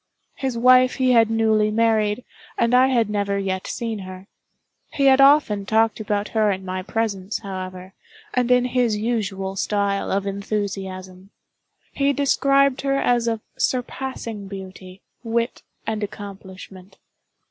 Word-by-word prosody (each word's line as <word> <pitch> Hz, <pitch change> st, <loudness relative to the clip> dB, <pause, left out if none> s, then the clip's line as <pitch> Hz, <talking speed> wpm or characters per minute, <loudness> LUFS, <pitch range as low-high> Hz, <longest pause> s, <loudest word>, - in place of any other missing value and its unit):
His 265 Hz, -3 st, -3 dB
wife 255 Hz, +1 st, +5 dB
he 260 Hz, -1 st, +2 dB
had 230 Hz, -2 st, +5 dB
newly 220 Hz, -1 st, +2 dB
married, 220 Hz, 0 st, +1 dB, 0.3 s
and 235 Hz, +1 st, +1 dB
I 255 Hz, +1 st, +6 dB
had 240 Hz, -4 st, +2 dB
never 200 Hz, -1 st, -1 dB
yet 190 Hz, -1 st, -3 dB
seen 225 Hz, -3 st, -4 dB
her. 185 Hz, 0 st, -9 dB, 0.7 s
He 280 Hz, -, +1 dB
had 270 Hz, 0 st, +6 dB
often 275 Hz, -8 st, +5 dB
talked 220 Hz, +2 st, +1 dB
about 205 Hz, -1 st, -2 dB
her 215 Hz, -2 st, +2 dB
in 190 Hz, -1 st, -3 dB
my 185 Hz, 0 st, -3 dB
presence, 200 Hz, -1 st, -2 dB
however, 185 Hz, -1 st, -7 dB, 0.4 s
and 250 Hz, -1 st, +1 dB
in 250 Hz, 0 st, +4 dB
his 245 Hz, -3 st, +1 dB
usual 200 Hz, -4 st, -2 dB
style 200 Hz, 0 st, -1 dB
of 195 Hz, 0 st, 0 dB
enthusiasm. 195 Hz, -2 st, -5 dB, 0.6 s
He 280 Hz, 0 st, +1 dB
described 275 Hz, -1 st, +2 dB
her 275 Hz, 0 st, 0 dB
as 240 Hz, -3 st, +1 dB
of 225 Hz, -1 st, -1 dB, 0.2 s
surpassing 245 Hz, -4 st, -3 dB
beauty, 190 Hz, -1 st, -10 dB, 0.2 s
wit, 230 Hz, +1 st, -2 dB, 0.2 s
and 220 Hz, -1 st, -2 dB
accomplishment. 195 Hz, -2 st, -9 dB
215 Hz, 135 wpm, -22 LUFS, 195-245 Hz, 0.7 s, I